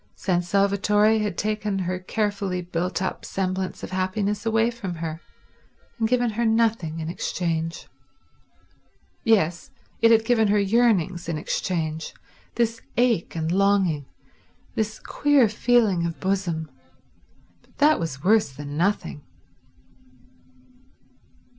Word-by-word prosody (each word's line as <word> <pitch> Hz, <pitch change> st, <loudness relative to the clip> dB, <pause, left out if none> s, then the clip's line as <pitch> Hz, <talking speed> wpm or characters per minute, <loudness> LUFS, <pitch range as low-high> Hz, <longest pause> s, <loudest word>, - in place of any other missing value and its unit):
San 180 Hz, -2 st, 0 dB
Salvatore 200 Hz, +3 st, +2 dB
had 210 Hz, -1 st, -2 dB
taken 210 Hz, -1 st, -1 dB
her 185 Hz, -1 st, -2 dB
carefully 200 Hz, -1 st, -2 dB
built 180 Hz, +2 st, -2 dB
up 185 Hz, -, -3 dB
semblance 185 Hz, 0 st, -3 dB
of -, -, -6 dB
happiness 200 Hz, +3 st, -1 dB
away 225 Hz, +1 st, +2 dB
from 205 Hz, -7 st, -6 dB
her, 160 Hz, 0 st, -5 dB, 0.8 s
and 225 Hz, -, +2 dB
given 245 Hz, 0 st, +1 dB
her 235 Hz, +3 st, -1 dB
nothing 220 Hz, -8 st, +1 dB
in 160 Hz, -, -4 dB
exchange. 165 Hz, -1 st, -3 dB, 1.4 s
Yes—it 200 Hz, +2 st, +1 dB
had 225 Hz, -1 st, +5 dB
given 225 Hz, -2 st, +3 dB
her 205 Hz, +1 st, +3 dB
yearnings 195 Hz, -5 st, +2 dB
in 165 Hz, -, -1 dB
exchange, 160 Hz, -1 st, -3 dB, 0.4 s
this 230 Hz, -1 st, 0 dB, 0.2 s
ache 235 Hz, -10 st, +1 dB
and 160 Hz, 0 st, -1 dB
longing, 190 Hz, -7 st, +2 dB, 0.7 s
this 220 Hz, 0 st, -2 dB
queer 290 Hz, -5 st, +3 dB
feeling 215 Hz, -5 st, +2 dB
of 165 Hz, -, -6 dB
bosom; 175 Hz, -6 st, -2 dB, 0.9 s
but -, -, -30 dB
that 300 Hz, +2 st, +4 dB
was 150 Hz, -4 st, -4 dB
worse 210 Hz, -5 st, +3 dB
than 145 Hz, +2 st, -7 dB
nothing. 175 Hz, -3 st, -1 dB
195 Hz, 115 wpm, -24 LUFS, 170-220 Hz, 1.4 s, had